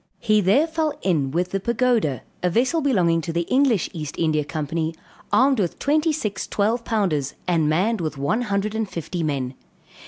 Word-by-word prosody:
He 215 -2 +2
there 205 - +4
fell 315 -2 -2
in 155 -8 +1
with 175 +5 -1
the 195 - 0
Pagoda, 235 - +1 0.2
a 180 - +2
vessel 255 - +1
belonging 180 - +2
to 165 - -4
the 170 +1 0
English 255 -1 +2
East 155 -4 -5
India 155 -2 +1
Company, 160 +2 -3 0.4
armed 265 -1 +4
with 180 -5 -1
twenty 305 +3 +2
six 210 -10 -3
twelve 225 +4 0
pounders 180 - -1
and 165 -4 +2
manned 195 +7 +1
with 155 -3 -3
one 145 - 0
hundred 205 -2 -1
and 220 -2 -2
fifty 170 +1 -4
men. 135 -5 -2
190 Hz, 180 wpm, -23 LUFS, 160-235 Hz, 0.4 s, there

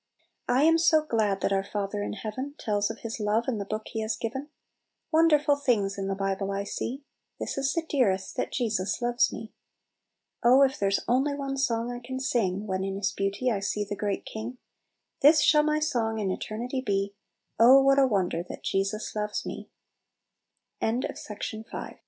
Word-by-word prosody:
" - - -51
"I 255 +3 +4
am 325 +1 +5
so 315 -1 +4
glad 215 -8 0
that 195 - +1
our 195 0 +1
Father 205 0 -3
in - - -3
heaven 245 +7 -5
Tells 205 -2 0
of - - -7
His 230 0 -4
love 215 +2 +1
in 235 -5 -1
the 200 - -3
book 215 +2 -4
He 225 - -3
has 220 +1 -1
given, 265 +6 -4 0.6
Wonderful 305 -3 +4
things 220 -8 +1
in 195 -1 -3
the 195 - -1
Bible 195 0 -2
I 200 0 -2
see; 255 +6 -4 0.4
This - - -3
is 275 0 0
the 335 -1 -1
dearest, 200 -11 +1
that - - -2
Jesus 215 -5 -1
loves 240 0 +2
me. 225 - -8 0.9
"Oh, 255 +3 +6
if 270 -1 +1
there's 200 0 +1
only 270 +4 +2
one 275 -1 -3
song 240 -3 0
I 245 - -5
can 260 +2 -5
sing 215 -7 0
When 190 -2 -2
in 195 0 -3
His 200 +1 -1
beauty 200 +6 -1
I 205 - 0
see 205 +1 -2
the 205 - -3
great 205 -1 -2
King; 225 +3 -6 0.6
This 300 +3 +7
shall 300 -1 +5
my 305 0 +1
song 240 -8 0
in 200 -3 -1
eternity 240 +7 -3
be, 200 -3 -1 0.2
* - - -39
Oh, 255 +4 +9
what 275 0 +4
a 270 - +5
wonde 185 -6 0
225 Hz, 175 wpm, -27 LUFS, 200-270 Hz, 0.9 s, Oh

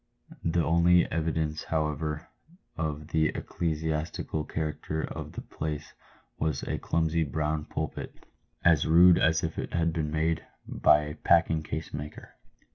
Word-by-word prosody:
The 85 0 +2
only 85 +2 +5
evidence, 80 -1 -1
however, 75 0 -2 0.5
of 75 -2 -3
the 80 -1 +3
ecclesiastical 80 -1 -2
character 80 0 -3
of - - -6
the - - -5
place 75 -1 -5 0.5
was 80 -3 -1
a - - -2
clumsy 80 0 +1
brown 75 +1 -1
pulpit, - - -4 0.5
as 80 -3 +5
rude 85 +2 +7
as 80 -1 +3
if 80 -1 -3
it - - -4
had 85 -1 +1
been 80 -2 -1
made 80 +1 0 0.2
by 75 - +4
a 75 0 -5
packing 80 0 +3
case 80 +1 -5
maker. 75 0 -7
80 Hz, 135 wpm, -28 LUFS, 75-80 Hz, 0.5 s, rude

